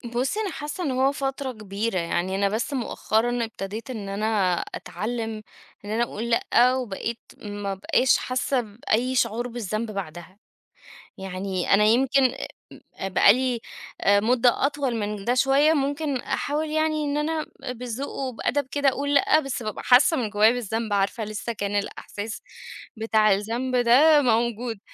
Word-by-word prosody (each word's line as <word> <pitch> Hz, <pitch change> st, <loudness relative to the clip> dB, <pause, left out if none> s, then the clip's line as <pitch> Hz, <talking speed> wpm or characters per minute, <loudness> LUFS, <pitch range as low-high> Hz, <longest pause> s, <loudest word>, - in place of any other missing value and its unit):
بصي 260 Hz, -, 0 dB
أنا 415 Hz, -3 st, -2 dB
حاسّة 300 Hz, +4 st, -5 dB
إن 290 Hz, -, -1 dB
هو 260 Hz, +2 st, +2 dB
فترة 270 Hz, -1 st, -3 dB
كبيرة 210 Hz, -2 st, -3 dB
يعني. 175 Hz, +2 st, -1 dB
أنا 200 Hz, 0 st, +1 dB
بس 220 Hz, +7 st, -2 dB
مؤخرًا 240 Hz, -1 st, 0 dB
ابتديت 220 Hz, +2 st, -7 dB
إن 215 Hz, -6 st, -5 dB
أنا 200 Hz, -2 st, +1 dB, 0.2 s
أتعلّم 220 Hz, +3 st, -4 dB, 0.4 s
إن 205 Hz, -, -7 dB
أنا 225 Hz, +2 st, +1 dB
أقول 235 Hz, 0 st, -4 dB
لأ، 240 Hz, +1 st, +3 dB
وبقيت 230 Hz, -2 st, -4 dB, 0.2 s
ما 205 Hz, -1 st, -5 dB
أبقاش 225 Hz, +6 st, +2 dB
حاسّة 255 Hz, +1 st, -1 dB
بأي 230 Hz, +3 st, -1 dB
شعور 240 Hz, 0 st, 0 dB
بالذنب 225 Hz, -2 st, -4 dB
بعدها. 185 Hz, 0 st, -7 dB, 0.8 s
يعني 190 Hz, -1 st, -2 dB
أنا 205 Hz, +1 st, +5 dB
يمْكِن 265 Hz, +5 st, +4 dB
آآ 255 Hz, 0 st, 0 dB, 0.6 s
م -, -, -17 dB
بقى 200 Hz, -, +7 dB
لي 255 Hz, -1 st, -1 dB, 0.5 s
مدة 235 Hz, +6 st, +4 dB
أطول 275 Hz, -4 st, -1 dB
من 210 Hz, -2 st, -3 dB
ده 245 Hz, -, +2 dB
شويّة 275 Hz, +4 st, +4 dB
ممكن 285 Hz, 0 st, -1 dB
أحاول 300 Hz, +5 st, -2 dB
يعني 310 Hz, 0 st, 0 dB
إن 285 Hz, 0 st, -1 dB
أنا 310 Hz, +1 st, -1 dB, 0.3 s
بالذوق 250 Hz, +2 st, -5 dB
وبأدب 265 Hz, +1 st, -2 dB
كده 285 Hz, +1 st, +3 dB
أقول 285 Hz, +2 st, -2 dB
لأ، 310 Hz, -, +5 dB
بس 275 Hz, -5 st, -4 dB
بابقى 215 Hz, -1 st, -5 dB
حاسّة 260 Hz, +6 st, +5 dB
من 230 Hz, -4 st, -1 dB
جوايّا 210 Hz, +2 st, +5 dB
بالذنب، 225 Hz, -2 st, -3 dB
عارفة 200 Hz, +3 st, 0 dB
لسّه 215 Hz, +2 st, -4 dB
كان 205 Hz, -1 st, -3 dB
الإحساس 205 Hz, +1 st, -4 dB, 0.6 s
بتاع 220 Hz, -1 st, +3 dB
الذنب 230 Hz, +6 st, -2 dB
ده 270 Hz, +6 st, +6 dB
موجود. 235 Hz, -2 st, 0 dB
235 Hz, 150 wpm, -24 LUFS, 210-265 Hz, 0.8 s, بقى